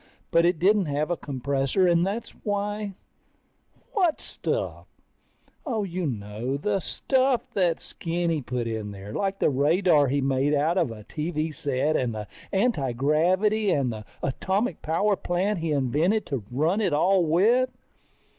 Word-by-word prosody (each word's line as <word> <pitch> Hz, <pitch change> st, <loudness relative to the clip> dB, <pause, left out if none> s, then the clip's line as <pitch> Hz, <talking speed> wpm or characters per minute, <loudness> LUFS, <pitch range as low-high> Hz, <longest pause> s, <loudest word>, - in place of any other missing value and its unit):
But 170 Hz, 0 st, +4 dB
it 175 Hz, 0 st, +3 dB
didn't 195 Hz, +2 st, +3 dB
have 150 Hz, +3 st, -1 dB
a -, -, +2 dB
compressor 140 Hz, +4 st, 0 dB
and 170 Hz, -1 st, +4 dB
that's 205 Hz, +5 st, -2 dB
why... 205 Hz, -1 st, -2 dB, 1.0 s
What 360 Hz, -6 st, +2 dB
stuff? -, -, -4 dB, 0.8 s
Oh, 230 Hz, -9 st, -1 dB
you 180 Hz, -3 st, -2 dB
know, 110 Hz, +2 st, -3 dB
the 200 Hz, +7 st, 0 dB
stuff 260 Hz, -, +1 dB
that 175 Hz, -4 st, +1 dB
Skinny 165 Hz, -2 st, -2 dB
put 125 Hz, -2 st, -3 dB
in 110 Hz, -2 st, -3 dB
there. 100 Hz, +1 st, -8 dB
Like 195 Hz, -, -1 dB
the -, -, +2 dB
radar 150 Hz, +2 st, +3 dB
he 140 Hz, +2 st, +1 dB
made 135 Hz, +2 st, +1 dB
out 160 Hz, +6 st, +2 dB
of 165 Hz, -7 st, +1 dB
a 110 Hz, -2 st, -9 dB
TV 155 Hz, +4 st, -3 dB
set 140 Hz, +2 st, 0 dB
and 120 Hz, -3 st, 0 dB
the 105 Hz, -1 st, -5 dB, 0.2 s
antigravity 185 Hz, -, +2 dB
and 135 Hz, -8 st, +1 dB
the 110 Hz, -1 st, -7 dB, 0.2 s
atomic 190 Hz, -, -1 dB
power 195 Hz, +6 st, +1 dB
plant 185 Hz, +2 st, -1 dB
he 165 Hz, -1 st, -2 dB
invented 150 Hz, -, +1 dB
to 135 Hz, -6 st, -3 dB
run 160 Hz, -, +1 dB
it 200 Hz, -, +1 dB
all 185 Hz, +5 st, +3 dB
with. 215 Hz, +11 st, +3 dB
165 Hz, 150 wpm, -26 LUFS, 135-195 Hz, 1.0 s, But